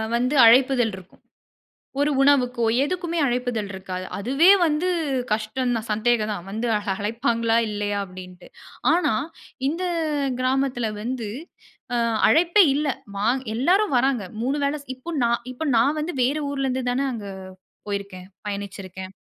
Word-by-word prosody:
வந்து 250 +4 0
அழைப்பிதழ் 245 -1 +5
இருக்கும். 185 -1 -16 0.8
ஒரு 295 +1 +2
உணவுக்கோ! 255 -4 +3 0.2
எதுக்குமே 345 +2 -2
அழைப்பிதழ் 245 -4 -1
இருக்காது. 185 -1 -6
"அதுவே 270 - +3 0.2
வந்து 310 +3 0 0.4
கஷ்டம் 220 +4 -1
தான், 225 0 -4
சந்தேகம் 215 0 +1
தான், 180 -3 -7
வந்து 225 +4 -2 0.3
அழைப்பாங்களா? 230 +2 0
இல்லயா!" 205 -1 -2
அப்பிடீன்ட்டு. 180 -1 -12 0.5
ஆனா, 345 -9 +2 0.6
இந்த 335 +5 -3 0.6
கிராமத்தில 255 -2 0
வந்து 240 0 -3 0.7
அ - - +2 0.3
அழைப்பே 345 +5 +5
இல்ல. 300 +1 0 0.3
வா 200 - -1 0.3
எல்லாரும் 365 - +2
வராங்க. 255 -3 +1 0.2
3 265 +5 0
வேள 280 +1 +1
ஸ் - - -31
இப்போ 255 +6 -10
நான் 235 0 +1
இப்ப 255 +5 -5
நான் 275 +7 +3
வந்து 320 +4 -3
வேற 275 +5 +1
ஊர்லேருந்து 265 -2 -1
தான 265 +3 0
அங்க 215 -4 -6 0.6
போயிருக்கேன், 200 -2 -5 0.2
பயணிச்சிருக்கேன். 190 -2 -6
245 Hz, 130 wpm, -23 LUFS, 210-275 Hz, 0.8 s, அழைப்பிதழ்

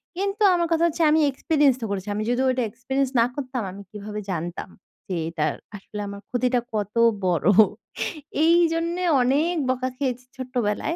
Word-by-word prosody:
কিন্তু 395 +2 -1
আমার 340 -1 +1
কথা 330 +1 +2
হচ্ছে 330 0 -1
আমি 315 - +4
এক্সপেরিয়েন্স 285 -1 +2
ও - - 0
করেছি। 195 0 -3
আমি 215 - -1
যদি 250 +2 +1
ওইটা 255 -1 +1
এক্সপেরিয়েন্স 265 +3 -2
না 230 - +5
করতাম 255 -3 -3
আমি 200 +2 -10
কিভাবে 210 0 -6
জানতাম 175 +1 -4 0.4
যে, 185 - -2
এটা 155 -2 -1 0.3
আসলে 205 +1 -9
আমার 200 0 -7
ক্ষতিটা 250 0 +1
কত 210 +1 -3 0.3
বড় 175 -2 +1 1.0
এই 335 +1 +6 0.2
জন্যে 340 +2 -1 0.2
অনেক 295 +8 +2
বকা 255 0 0
খেয়েছি 255 -2 -2
ছোট্টবেলায়। 250 +3 -2
255 Hz, 165 wpm, -24 LUFS, 210-305 Hz, 1.0 s, এই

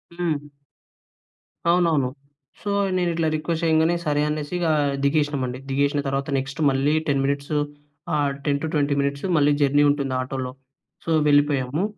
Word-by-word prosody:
హ్మ్. 160 -4 -2 1.2
అవునవును. 165 -7 +3 0.5
సో, 205 - -4 0.3
నేను 175 -1 +1
ఇట్లా 165 -1 0
రిక్వెస్ట్ 160 +2 -2
చేయంగానే 160 +1 +3
సరే 145 -1 +1
అనేసి 150 +1 -3
ఇగా 165 -2 +1 0.3
దిగేసినామండి. 140 -3 0
దిగేసిన 140 +2 +1
తర్వాత 135 +1 -2
నెక్స్ట్ 135 +2 -4
మళ్ళీ 135 +2 +1
10 140 -2 +2
మినిట్స్ 140 +1 -2 0.6
ఆహ్, 145 -2 +1
10-20 145 0 0
మినిట్స్ 140 +2 -2
మళ్ళీ 145 -1 +4
జర్నీ 145 +1 +4
ఉంటుంది 140 -2 0
ఆటోలో. 130 0 -4 0.5
సో, - - -5 0.2
వెళ్ళిపోయాము. 145 +1 +2
145 Hz, 130 wpm, -23 LUFS, 140-155 Hz, 1.2 s, మళ్ళీ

